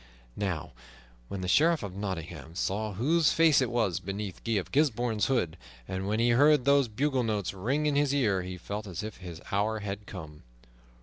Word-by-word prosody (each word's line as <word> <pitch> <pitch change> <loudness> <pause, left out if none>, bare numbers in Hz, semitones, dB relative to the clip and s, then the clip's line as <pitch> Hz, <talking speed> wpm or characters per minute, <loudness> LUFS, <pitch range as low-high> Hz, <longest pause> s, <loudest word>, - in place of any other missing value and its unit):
Now 85 -7 -2 0.6
when 95 - -5
the 90 - -3
Sheriff 160 - +4
of 95 -2 -6
Nottingham 85 -5 -5
saw 105 +3 -1
whose 150 - +3
face 160 -4 +5
it 130 - +1
was 110 -8 0
beneath 95 0 -5
Guy 115 - -1
of 100 -4 -1
Gisbourne's 120 -7 +1
hood, 90 -11 0 0.3
and 95 +1 -3
when 105 +2 0
he 120 +1 +3
heard 145 +2 +5
those 140 -2 +4
bugle 130 +4 0
notes 105 -5 -1
ring 130 +11 -1
in 150 -1 +2
his 145 -1 +3
ear, 110 -10 +2
he 90 0 -6
felt 105 +4 -5
as 90 +1 -5
if 110 -1 -6
his 85 -3 -9
hour 105 +2 0
had 100 0 -5
come. 80 -5 -9
105 Hz, 190 wpm, -29 LUFS, 95-130 Hz, 0.6 s, face